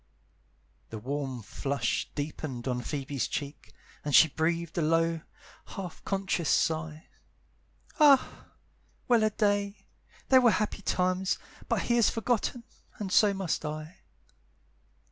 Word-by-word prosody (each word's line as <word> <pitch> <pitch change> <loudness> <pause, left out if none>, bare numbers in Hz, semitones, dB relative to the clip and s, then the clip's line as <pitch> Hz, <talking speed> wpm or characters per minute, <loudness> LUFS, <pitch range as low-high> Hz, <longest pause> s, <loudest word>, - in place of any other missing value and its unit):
The 110 - -6
warm 130 +1 -4
flush 125 +4 -2
deepened 145 -4 -5
on 125 -1 -1
Phoebe's 140 -1 -3
cheek, 145 0 -6 0.3
And 145 -2 +1
she 160 - +8
breathed 165 +2 -1
a - - +1
low, 165 +1 +1 0.5
half 185 -4 -7
conscious 190 -5 -1
sigh; 160 -1 0 0.9
"Ah, 285 -3 +4 0.6
well 235 -3 +4
a 215 - +4
day! 205 -1 -1 0.4
they 260 - +8
were 245 -2 +5
happy 210 -1 -2
times, 185 0 0 0.3
But - - +1
he 240 - +1
has 235 - +5
forgotten, 235 +1 -1 0.3
and 200 -3 -5
so 210 +1 +5
must 190 -6 -2
I." 155 +2 -6
165 Hz, 125 wpm, -29 LUFS, 145-205 Hz, 0.9 s, she